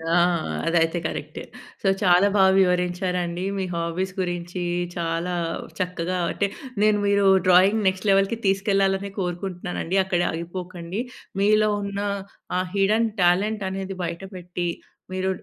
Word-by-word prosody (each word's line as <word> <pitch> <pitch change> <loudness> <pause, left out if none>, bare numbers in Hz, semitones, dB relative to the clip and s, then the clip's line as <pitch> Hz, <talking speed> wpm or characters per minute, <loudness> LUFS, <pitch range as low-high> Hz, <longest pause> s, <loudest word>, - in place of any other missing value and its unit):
ఆ! - - +5 0.5
అదైతే 165 0 +2
కరెక్టే. 150 -1 -4 0.4
సో, 195 - 0
చాలా 180 0 +5
బాగా 190 -1 +6
వివరించారండి. 180 -1 0
మీ 190 - -1
హాబీస్ 170 +3 -2
గురించి 175 0 -3 0.4
చాలా 170 +1 -1 0.5
చక్కగా 180 0 -2
అంటే, 200 - 0 0.3
నేను 210 -1 +4
మీరు 200 0 +3 0.2
డ్రాయింగ్ 195 +4 +5
నెక్స్ట్ 190 +2 0
లెవెల్‌కి 195 +3 +3
తీసుకెళ్లాలనే 195 0 +1
కోరుకుంటున్నానండి. 180 0 -3
అక్కడే 175 -2 0
ఆగిపోకండి. 175 +3 -5 0.4
మీలో 215 +1 +4
ఉన్న 200 0 -4 0.6
ఆ - - +2
హిడెన్ 215 +3 +3
టాలెంట్ 195 +4 +2
అనేది 195 0 -4
బయటపెట్టి, 180 0 -5 0.5
మీరు 185 0 -1
185 Hz, 115 wpm, -24 LUFS, 175-195 Hz, 0.6 s, బాగా